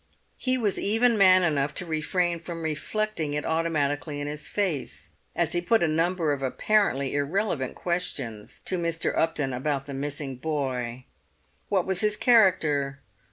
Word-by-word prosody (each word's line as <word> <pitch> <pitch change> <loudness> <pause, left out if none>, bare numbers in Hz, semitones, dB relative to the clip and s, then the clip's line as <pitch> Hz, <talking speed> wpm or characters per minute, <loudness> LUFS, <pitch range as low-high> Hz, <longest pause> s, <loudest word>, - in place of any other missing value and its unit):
He 255 0 +1
was 210 -5 0
even 225 +3 +3
man 185 -3 +6
enough 145 -4 +1
to 180 - -4
refrain 170 +2 0
from 165 0 -7
reflecting 160 +1 -2
it 150 0 -2
automatically 155 -2 -1
in 145 - -3
his 150 +1 -5
face, 185 -9 -3 0.2
as - - +1
he 175 - 0
put 225 +3 +2
a - - +3
number 165 0 +1
of 140 - -4
apparently 140 -1 +1
irrelevant 145 - -1
questions 125 -12 -3
to 185 - -1
Mr. 165 -1 -1
Upton 145 -5 0
about 135 +2 -2
the 140 - -7
missing 140 -1 -4
boy. 130 -4 -3 0.6
What 190 -3 +2
was 190 -1 0
his 210 -1 +1
character? 155 - +3
160 Hz, 155 wpm, -26 LUFS, 145-185 Hz, 0.6 s, man